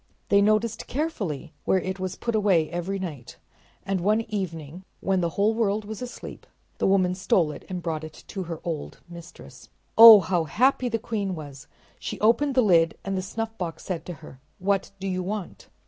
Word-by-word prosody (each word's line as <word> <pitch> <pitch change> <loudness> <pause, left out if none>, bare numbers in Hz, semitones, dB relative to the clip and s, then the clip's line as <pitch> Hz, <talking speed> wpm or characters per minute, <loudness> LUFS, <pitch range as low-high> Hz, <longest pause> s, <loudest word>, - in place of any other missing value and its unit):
They 200 0 +5
noticed 215 +1 +1
carefully 200 - -3
where - - +3
it 190 +1 -4
was 185 0 -3
put 235 - -3
away 195 -7 +2
every 175 +3 -3
night, 155 -10 -7 0.5
and 195 -2 -1
one 210 +4 +2
evening, 180 -6 -5 0.2
when 190 -1 0
the 170 - 0
whole 210 +2 +3
world 215 -2 0
was 215 +1 -7
asleep, 250 -1 -8 0.3
the - - +2
woman 185 -2 +3
stole 180 -3 +1
it 145 - -10
and 180 -2 -5
brought 160 -2 -3
it 155 0 -10
to 195 - -4
her 165 -1 -6
old 160 -4 -5
mistress. 170 0 -13 0.3
Oh, 225 -2 +12
how 175 -2 0
happy 250 - +2
the 225 - 0
queen 210 -5 -3
was! 145 -4 -10 0.3
She - - -5
opened 245 +6 +3
the 255 - +5
lid 165 -5 +3
and 195 0 -2
the 185 - -1
snuffbox 190 -3 -5
said 170 -4 -3
to 175 - -4
her: 130 - -13 0.2
"What 195 +1 0
do 195 - -4
you 185 -1 -1
want?" 195 0 -6
190 Hz, 190 wpm, -25 LUFS, 170-215 Hz, 0.5 s, Oh